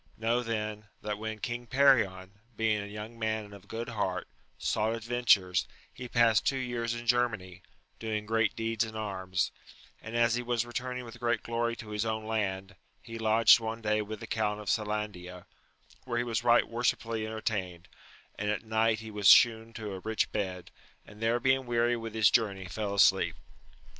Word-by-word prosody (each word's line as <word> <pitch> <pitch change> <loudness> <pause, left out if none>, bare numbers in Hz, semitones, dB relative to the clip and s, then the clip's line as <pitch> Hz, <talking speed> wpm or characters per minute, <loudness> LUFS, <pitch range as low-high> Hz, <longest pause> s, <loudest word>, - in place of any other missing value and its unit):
Know 115 +2 +1
then 110 -2 -4 0.2
that 105 -1 -3
when 110 0 -4
King 120 +2 -5
Perion, 115 -9 +3 0.2
being 110 -1 +1
a 100 - -6
young 105 +3 -8
man 110 -1 -1
and 100 - -14
of 100 -1 -13
good 115 +2 -5
heart, 95 -5 -2 0.3
sought 110 +2 0
adventures, 110 -7 +2 0.3
he 125 - -7
passed 115 -3 +4
two 135 - +1
years 120 -2 -2
in 120 0 -7
Germany, 110 -7 0 0.4
doing 110 -2 -3
great 110 -1 +1
deeds 115 0 0
in 110 -1 -7
arms, 95 -4 -2 0.5
and 110 +2 -7
as 120 0 +3
he 120 - 0
was 120 -1 -1
returning 125 +1 -4
with 115 +1 -11
great 120 0 0
glory 115 0 -1
to 110 -3 -10
his 105 0 -1
own 110 -1 -2
land, 100 -3 -2 0.3
he 115 -1 -8
lodged 110 +1 +6
one 115 0 -5
day 105 0 +1
with 105 0 -6
the - - -5
Count 105 -2 -1
of 105 -3 -2
Selandia, 105 -5 -3 0.6
where 120 -2 -2
he 120 - +1
was 115 -2 -2
right 120 0 +4
worshipfully 115 -1 -1
entertained, 95 -6 -3 0.5
and 105 +1 -1
at 105 +1 -2
night 110 0 +1
he 110 -1 -8
was 105 -2 0
shewn 115 -1 +6
to 105 -3 -6
a 95 - -6
rich 110 +3 -1
bed, 95 -4 -4 0.3
and 105 +1 -15
there 115 +2 +2
being 130 +1 +2
weary 120 0 +2
with 115 -1 -6
his 110 -2 +5
journey 100 -5 +1
fell 100 +2 -3
asleep. 100 - +4
110 Hz, 185 wpm, -30 LUFS, 105-115 Hz, 0.6 s, lodged